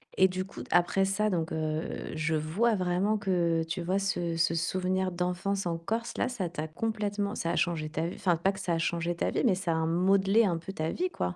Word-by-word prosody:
Et 190 Hz, -, +6 dB
du 185 Hz, 0 st, -3 dB
coup 195 Hz, -, -9 dB
d -, -, -14 dB
après 175 Hz, +2 st, +3 dB
ça, 210 Hz, +2 st, +1 dB
donc 165 Hz, -4 st, -1 dB
heu, 155 Hz, 0 st, -3 dB
je 160 Hz, 0 st, 0 dB
vois 185 Hz, +10 st, +1 dB
vraiment 185 Hz, +3 st, +1 dB
que, 175 Hz, -5 st, +1 dB
heu, -, -, -2 dB
tu 170 Hz, +3 st, -3 dB
vois 185 Hz, +3 st, 0 dB
ce 175 Hz, -4 st, -1 dB
ce 165 Hz, 0 st, +2 dB
souvenir 185 Hz, +2 st, 0 dB
d'enfance 180 Hz, +2 st, -1 dB
en 170 Hz, -1 st, -1 dB
Corse, 225 Hz, +8 st, -3 dB
là, -, -, +1 dB
ça 195 Hz, -8 st, -3 dB
t'a 160 Hz, -2 st, -4 dB
complètement 205 Hz, +3 st, -2 dB
ça 165 Hz, -1 st, -1 dB
a -, -, -1 dB
changé 165 Hz, -4 st, 0 dB
ta 160 Hz, +2 st, -2 dB
v 175 Hz, -, -5 dB
enfin, 175 Hz, -3 st, +2 dB
pas 190 Hz, +4 st, +2 dB
que 195 Hz, -, -9 dB
ça 180 Hz, -3 st, -1 dB
a -, -, +1 dB
changé 170 Hz, +1 st, -1 dB
ta -, -, 0 dB
vie, -, -, 0 dB
mais 220 Hz, -, +5 dB
ça 180 Hz, -2 st, -1 dB
a 160 Hz, 0 st, 0 dB
modelé 195 Hz, +6 st, +3 dB
un 175 Hz, -4 st, +1 dB
peu 165 Hz, +3 st, -7 dB
ta 160 Hz, -3 st, -2 dB
vie, 365 Hz, +1 st, -1 dB
quoi? 90 Hz, -, -3 dB
180 Hz, 250 wpm, -29 LUFS, 165-195 Hz, -, Et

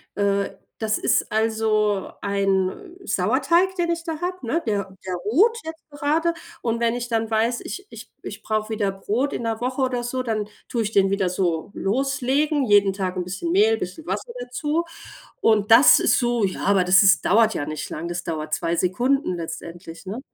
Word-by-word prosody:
äh, 200 Hz, -1 st, 0 dB, 0.2 s
das 215 Hz, -1 st, 0 dB
ist -, -, +1 dB
also 215 Hz, -2 st, +1 dB
ein 200 Hz, -, -1 dB
Sauerteig, 365 Hz, +1 st, +2 dB
den 340 Hz, -1 st, 0 dB
ich 335 Hz, -1 st, -1 dB
da 325 Hz, -2 st, -5 dB
habe, 360 Hz, -4 st, -4 dB
ne, 325 Hz, +9 st, 0 dB
der 200 Hz, -2 st, -2 dB
der 185 Hz, -, -2 dB
ruht 350 Hz, -, +2 dB
jetzt 320 Hz, -1 st, -9 dB
grade. 310 Hz, +4 st, 0 dB, 0.3 s
Und 230 Hz, -1 st, -1 dB
wenn 235 Hz, 0 st, +1 dB
ich 245 Hz, 0 st, -4 dB
dann 225 Hz, -1 st, -1 dB
weiß, 230 Hz, +2 st, +1 dB
ich 390 Hz, +2 st, -7 dB
ich -, -, -11 dB
ich -, -, -8 dB
brauche 215 Hz, 0 st, -1 dB
wieder 205 Hz, -3 st, -1 dB
Brot 215 Hz, +8 st, -2 dB
in -, -, -3 dB
'ner 225 Hz, -1 st, -2 dB
Woche 255 Hz, +2 st, -2 dB
oder 250 Hz, -2 st, 0 dB
so, 255 Hz, +2 st, -2 dB
dann 220 Hz, -4 st, -2 dB, 0.2 s
tue 230 Hz, -2 st, -1 dB
ich 210 Hz, -, -3 dB
den 195 Hz, -2 st, +3 dB
wieder 195 Hz, -2 st, 0 dB
so 175 Hz, -1 st, -1 dB
loslegen, 275 Hz, +6 st, 0 dB
jeden 205 Hz, -2 st, +4 dB
Tag 185 Hz, -1 st, -3 dB
'n 180 Hz, -, -1 dB
bisschen 180 Hz, -2 st, -4 dB
Mehl, 210 Hz, +5 st, +4 dB
'n -, -, -11 dB
bisschen 180 Hz, 0 st, -6 dB
Wasser 205 Hz, +5 st, -4 dB
dazu. 295 Hz, +7 st, -2 dB, 0.6 s
Und 215 Hz, -1 st, +2 dB
das 250 Hz, +5 st, +8 dB
ist -, -, +3 dB
so 240 Hz, -3 st, 0 dB
ja, 190 Hz, -, -2 dB
aber 195 Hz, -2 st, +4 dB
das 185 Hz, +2 st, +6 dB
ist 195 Hz, -2 st, +4 dB
dauert 220 Hz, +2 st, +4 dB
ja 145 Hz, -, -2 dB
nicht 155 Hz, 0 st, -5 dB
lange, 170 Hz, +3 st, -5 dB
das 175 Hz, +1 st, -4 dB
dauert 155 Hz, -2 st, -4 dB
2 170 Hz, +1 st, 0 dB
Sekunden 240 Hz, +6 st, +1 dB
letztendlich, 170 Hz, +1 st, -8 dB
ne? 205 Hz, +6 st, -5 dB
220 Hz, 195 wpm, -23 LUFS, 190-255 Hz, 0.6 s, das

